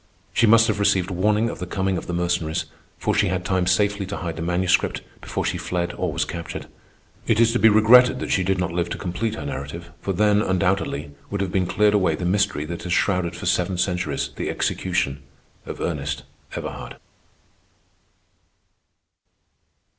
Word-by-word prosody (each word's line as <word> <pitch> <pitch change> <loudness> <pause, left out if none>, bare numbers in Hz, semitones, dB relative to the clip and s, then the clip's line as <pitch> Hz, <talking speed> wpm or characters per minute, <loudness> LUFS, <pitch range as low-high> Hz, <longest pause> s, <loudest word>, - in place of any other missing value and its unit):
She 115 - +4
must 115 +1 +7
have 110 -2 0
received 95 -2 +2
warning 105 +5 +2
of - - -5
the 90 - -5
coming 95 0 -1
of - - -5
the 90 - -3
Mercenaries, 85 -2 -1 0.3
for - - 0
she - - +2
had 90 0 -2
time 95 -1 +1
safely 100 +1 +1
to 100 - -4
hide 85 -3 -4
the - - -6
Manuscript 90 +2 +1 0.2
before - - -3
she - - -1
fled 90 -1 -2
or - - -2
was - - -1
captured. 85 -1 -6 0.6
It 115 -1 +3
is 115 0 +4
to 120 - +1
be 110 - +7
regretted 125 +4 +6
that - - -4
she 95 - +2
did 95 +1 +1
not 90 -1 -1
live 85 0 -1
to - - -4
complete 105 +5 -3
her 75 - -6
narrative, 70 +5 -6
for 100 - -2
then, 105 +2 +3
undoubtedly, 90 -7 0 0.2
would 100 - -3
have 95 -2 -2
been 90 -1 +1
cleared 105 +3 +3
away 100 -3 +2
the 90 - -4
mystery 90 -5 +1
that 85 +2 -6
has 90 0 -2
shrouded 90 -4 +1
for - - -7
seven 90 +1 +1
centuries 90 0 -1
the - - -2
execution 90 -7 -1 0.5
of - - -6
Ernest 75 -5 -3 0.3
Everhard. - - -6
90 Hz, 185 wpm, -23 LUFS, 85-105 Hz, 0.6 s, must